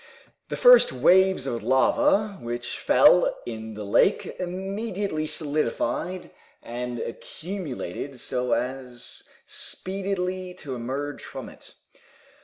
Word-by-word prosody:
The - - -3
first - - +7
waves 185 +4 +4
of 120 -4 -2
lava 205 - +2
which 120 0 -4
fell - - +5
in 110 -2 -6
the 105 - -6
lake 105 - +3
immediately 190 -2 -3
solidified 155 +3 -1 0.3
and 120 +1 -5
accumulated 140 - -6
so 125 -1 -1
as 125 -1 -4 0.2
speedily 185 -1 -3
to 145 -7 -7
emerge 135 +4 -4
from - - -8
it. - - -15
150 Hz, 100 wpm, -25 LUFS, 125-190 Hz, 0.3 s, first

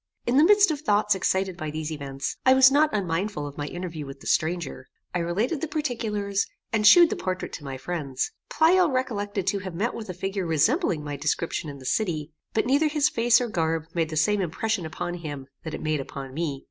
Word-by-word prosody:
In 245 +2 +2
the 295 - +7
midst 405 0 +6
of 295 -2 -3
thoughts 210 -6 +3
excited 190 -1 0
by 155 -2 -5
these 155 +1 -4
events, 140 -2 -4
I 260 0 +6
was 265 0 +7
not 295 +2 +4
unmindful 185 -4 -2
of 145 -1 -7
my 145 - -4
interview 170 -2 -5
with 135 0 -9
the - - -15
stranger. 160 -6 -1 0.3
I 180 - 0
related 210 - -1
the 325 - -1
particulars, 220 -10 -1 0.3
and 210 -1 +4
shewed 345 +8 +8
the - - 0
portrait 185 0 -4
to 150 - -7
my 135 -2 -5
friends. 140 -3 -3 0.2
Pleyel 340 +3 +4
recollected 205 -7 -2
to 195 +1 +1
have 185 -3 -7
met 220 +7 -1
with 220 -4 -7
a 185 - -5
figure 195 0 -3
resembling 165 - +2
my 145 -1 -5
description 150 +2 -2
in 140 - -8
the 130 - -13
city; 160 -3 -1 0.2
but 220 - +2
neither 280 +5 +3
his 300 -1 +2
face 235 +1 +4
or 245 - -1
garb 165 -5 -1
made 165 -2 0
the 155 - -4
same 205 +6 +2
impression 190 +1 -2
upon 175 +2 -4
him 150 -6 -6 0.2
that 160 -1 -5
it - - -7
made 155 -1 0
upon 135 -1 -8
me. 150 -3 -2
185 Hz, 220 wpm, -25 LUFS, 155-230 Hz, 0.3 s, shewed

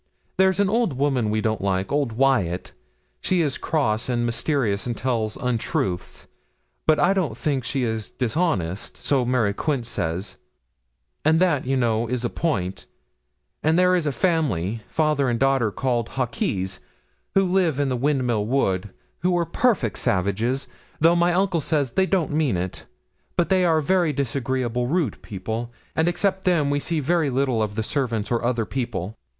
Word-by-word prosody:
There's 190 0 +3
an 200 - +4
old 220 - +1
women 130 -4 +1
we 110 +1 0
don't 110 -2 -1
like, 95 -1 -1
old 140 -5 0
Wyat, 110 -9 +1 0.5
she 185 -2 +1
is 145 -3 -2
cross 130 -8 0
and 120 -1 +1
mysterious 115 -4 0
and 120 -2 -3
tells 115 -3 -1
untruths; 110 -7 -2 0.6
but 155 -1 +5
I 180 +2 +4
don't 190 -5 -1
think 140 -4 -1
she 130 +1 -1
is 110 -2 -2
dishonest 115 - -1
so 135 -3 +1
Mary 120 -5 +1
Quince 135 -1 -1
says 85 +2 -3 0.9
and 160 +2 +4
that, 165 -8 +2
you 135 0 +1
know, 115 -2 +1
is 125 0 -2
a - - -1
point; 95 - -2 0.7
and 160 +2 +2
there 180 0 +4
is 175 -4 +1
a - - +1
family, 120 - 0
father 150 -2 +1
and 120 -1 0
daughter, 135 -4 +3
called 120 +1 -1
Hawkes, 115 - -2 0.6
who 195 0 +5
live 180 -6 +1
in 140 -1 +1
the 130 - 0
Windmill 125 -5 0
Wood, 105 -7 0 0.3
who 180 +1 +1
are 170 - +1
perfect 185 - +1
savages, 105 +8 0 0.3
though 165 +2 +5
my 175 +1 +3
uncle 180 -2 +1
says 145 -5 0
they 190 +9 +2
don't 185 -6 +1
mean 150 - +1
it; 90 +1 -5 0.5
but 175 - +2
they 190 -1 +3
are 160 -2 +3
very 175 0 +2
disagreeable, 125 -2 -1
rude 155 - -1
people; 110 +4 -5 0.2
and 160 +1 +2
except 190 +2 0
them 160 -6 +2
we 145 - +1
see 160 +2 -1
very 160 +1 +1
little 130 -3 +1
of 105 -1 -2
the 110 - -1
servants 115 -5 -1
or 120 -1 +1
other 120 -2 0
people. 110 -6 -3
130 Hz, 170 wpm, -23 LUFS, 110-160 Hz, 0.9 s, but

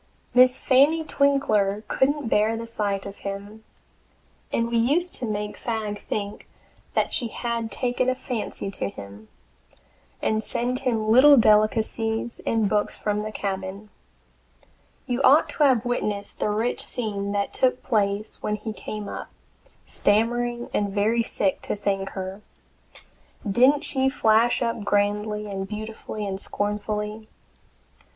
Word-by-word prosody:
Miss 255 +1 +6
Fanny 290 +5 +4
Twinkler 220 -9 +1
couldn't 285 0 +1
bear 220 +1 +2
the 230 - -5
sight 205 -4 -2
of 200 0 -8
him, 200 +2 -7 0.9
and 230 - +1
we 235 - +2
used 305 +10 +1
to 245 - -4
make 210 -1 -3
Fagg 215 -3 -3
think 205 0 -5 0.5
that - - +1
she 240 - 0
had 230 -1 -3
taken 250 +4 0
a 255 - +1
fancy 235 -6 -4
to 100 - -3
him, 100 +2 -11 0.9
and 215 0 0
send 250 +2 -1
him 225 -5 0
little 275 +4 +8
delicacies 220 +1 +2
and 225 -2 +2
books 210 0 0
from 210 0 -1
the 215 0 -4
cabin. 195 0 -5 1.1
You 245 0 -1
ought 280 +3 +6
to 300 - 0
have 255 -4 +3
witnessed 210 -4 -2
the - - 0
rich 220 +4 -1
scene 200 -4 -3
that 200 0 -1
took 255 -1 +1
place 205 -3 -1
when 210 - -1
he 215 +1 -6
came 210 -1 -6
up, - - -6 0.6
stammering 240 +3 0
and 205 -1 +1
very 215 +4 +2
sick, 200 -3 0
to - - -2
thank 195 -1 -1
her! 190 +2 -5 1.1
Didn't 255 +8 +4
she 265 -3 +1
flash 230 -1 +3
up 230 -2 -2
grandly 210 +1 0
and 195 -2 -4
beautifully 215 0 -6
and 190 -1 -3
scornfully? 210 +1 -3
215 Hz, 140 wpm, -24 LUFS, 205-240 Hz, 1.1 s, little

